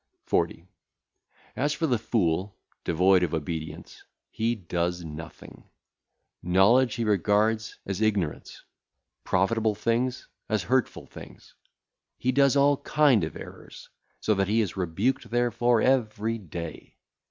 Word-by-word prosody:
40. 85 +2 -1 0.9
As 145 +3 0
for 165 - -1
the 125 -7 +1
fool, 95 -4 -1 0.3
devoid 90 +2 +3
of 85 -2 0
obedience, 80 0 -6 0.3
he 115 +2 0
doeth 90 -2 -2
nothing. 80 0 -10 0.7
Knowledge 105 +8 +4
he 120 - -2
regardeth 105 +2 +1
as 100 +1 -4
ignorance, 100 -8 -1 0.6
profitable 110 +3 +1
things 125 +4 -1 0.2
as 110 -4 0
hurtful 130 +4 0
things. - - -13 0.6
He 130 - 0
doeth 140 +1 +3
all 140 0 +4
kind 145 - +3
of 80 - -4
errors, - - -12 0.3
so 110 - +1
that 95 -1 0
he 110 +3 +2
is 105 - -3
rebuked 95 +8 -1
therefor 120 -1 +2
every 115 -3 +1
day. 85 -4 -8
110 Hz, 120 wpm, -26 LUFS, 90-120 Hz, 0.9 s, Knowledge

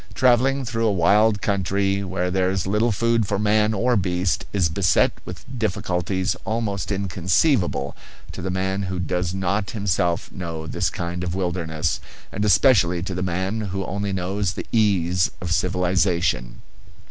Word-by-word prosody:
Travelling 130 +2 +3
through 115 -1 0
a - - +3
wild 100 +4 +3
country 100 0 0
where 90 -1 -2
there 95 0 +1
is 95 -2 -1
little 105 +4 +1
food 115 0 +1
for 100 - 0
man 105 +1 +2
or 120 +4 +1
beast 90 -3 0
is 95 -5 +2
beset 90 +3 +2
with - - -9
difficulties 95 -3 -1
almost 110 -3 -2
inconceivable 95 - +1 0.4
to - - -7
the 95 - -3
man 95 +1 -1
who 95 -1 -3
does 90 0 -2
not 95 +2 -1
himself 90 -5 -1
know 85 -3 -6
this 80 - -1
kind 85 +1 -4
of 90 -1 -3
wilderness, 85 -4 -1 0.3
and 105 - -2
especially 90 -4 +4
to 95 - -4
the 90 - -3
man 95 +4 -1
who 95 -2 -3
only 100 +1 -3
knows 95 +1 -1
the - - -6
ease 90 -6 +2
of 90 -1 -5
civilization. 90 -7 0
95 Hz, 155 wpm, -23 LUFS, 90-105 Hz, 0.4 s, especially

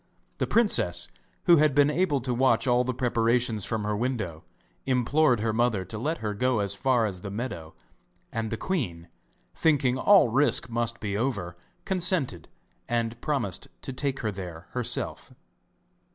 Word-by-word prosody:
The - - 0
princess, 90 - +2 0.4
who 175 -2 +7
had 150 -2 +3
been 145 0 +5
able 150 -4 +1
to 125 0 -1
watch 130 +3 +2
all 125 -1 +3
the 130 - -1
preparations 120 -3 +1
from 110 -2 -2
her 105 0 -1
window, 110 -9 -3 0.4
implored 130 0 +2
her 110 0 0
mother 110 -4 +1
to 105 +4 -7
let 155 +8 -1
her 105 - -1
go 125 +3 +1
as 100 -2 0
far 130 -4 +2
as 95 -4 -4
the 100 - -6
meadow; 100 -7 -5 0.6
and 115 -1 -3
the 115 - -3
queen, 90 - -3 0.4
thinking 135 -5 +2
all 190 - +6
risk 135 0 +2
must 115 0 0
be 100 -2 -2
over, 100 -7 -2 0.3
consented, 175 - 0 0.4
and 115 0 -1
promised 135 - -2 0.2
to 135 - -5
take 135 +1 -2
her 110 - -1
there 90 -4 -8
herself. 125 -2 -3
120 Hz, 160 wpm, -27 LUFS, 105-135 Hz, 0.6 s, who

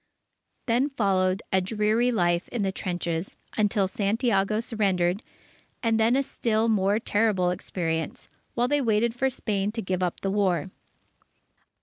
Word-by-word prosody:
Then 250 +4 +2
followed 195 -7 +1
a 190 - +4
dreary 215 +5 +1
life 175 -5 +1
in 235 -4 -2
the 195 - 0
trenches, 175 -2 -3 0.2
until 205 -2 +2
Santiago 210 +1 +1
surrendered, 195 -5 0 0.6
and 225 -1 +2
then 225 +3 +4
a 275 - +2
still 225 -3 0
more 205 -2 +2
terrible 205 -5 +1
experience, 165 -3 -3 0.3
while 240 +1 +2
they 290 +2 +2
waited 225 -1 +2
for 265 +2 +1
Spain 205 -5 -2
to 225 - -3
give 185 0 -2
up 180 -2 -1
the 195 - -1
war. 190 -3 +1
205 Hz, 140 wpm, -26 LUFS, 185-230 Hz, 0.6 s, a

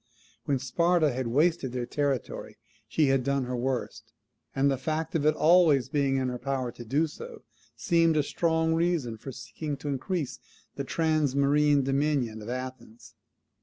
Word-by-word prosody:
When 140 - +1
Sparta 160 +4 +2
had 130 0 -2
wasted 145 +1 +1
their 125 -1 -2
territory 140 -1 -3 0.3
she 150 -4 +2
had 135 -1 +2
done 140 0 0
her 125 0 -3
worst; 125 0 -3 0.4
and 140 +1 +3
the 135 - 0
fact 160 +4 -2
of 150 -3 +1
its 155 - +2
always 155 -6 +4
being 140 -2 +1
in 130 -1 0
her 125 0 -5
power 130 -2 -2
to 120 - -10
do 140 +8 +1
so, 465 - -10 0.3
seemed 165 -4 +2
a 150 - +3
strong 160 +1 +1
reason 165 -8 0
for 120 +5 -8
seeking 140 +6 -6
to 145 +2 -5
increase 145 +2 -3 0.3
the - - -4
transmarine 145 -2 +2
dominion 135 -5 0
of 105 - -8
Athens. 125 -2 -7
140 Hz, 165 wpm, -28 LUFS, 130-160 Hz, 0.4 s, always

